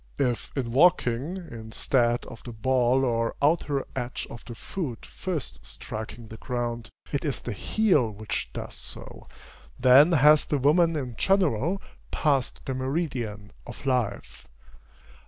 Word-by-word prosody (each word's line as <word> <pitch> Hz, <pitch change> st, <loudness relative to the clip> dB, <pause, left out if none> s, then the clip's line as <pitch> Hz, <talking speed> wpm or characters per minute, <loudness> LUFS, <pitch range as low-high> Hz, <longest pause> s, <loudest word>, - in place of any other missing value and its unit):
If 125 Hz, -4 st, -1 dB
in 120 Hz, -3 st, -1 dB
walking, 145 Hz, +1 st, +3 dB
instead 120 Hz, -, 0 dB
of 115 Hz, -, -10 dB
the 120 Hz, -, -8 dB
ball 130 Hz, +3 st, +2 dB
or 115 Hz, -2 st, 0 dB
outer 145 Hz, -2 st, +1 dB
edge 125 Hz, -1 st, -3 dB
of 115 Hz, -, -9 dB
the 120 Hz, -, -8 dB
foot 135 Hz, -, -5 dB
first 175 Hz, -7 st, -5 dB
striking 110 Hz, +1 st, -8 dB
the 110 Hz, -, -10 dB
ground, 120 Hz, -2 st, -3 dB, 0.2 s
it 140 Hz, -, -1 dB
is 145 Hz, -5 st, -1 dB
the 120 Hz, -, -5 dB
heel 155 Hz, -, +2 dB
which 110 Hz, 0 st, -4 dB
does -, -, -6 dB
so, -, -, -9 dB, 0.5 s
then 135 Hz, +7 st, +7 dB
has 150 Hz, 0 st, +6 dB
the 145 Hz, -, +1 dB
woman 165 Hz, +5 st, +4 dB
in 130 Hz, -5 st, -4 dB
general 185 Hz, -, +2 dB, 0.3 s
passed 140 Hz, -5 st, 0 dB
the 135 Hz, -, -2 dB
meridian 130 Hz, -7 st, -3 dB, 0.2 s
of 120 Hz, +3 st, -10 dB
life. 125 Hz, -6 st, -2 dB
130 Hz, 135 wpm, -27 LUFS, 120-150 Hz, 0.5 s, then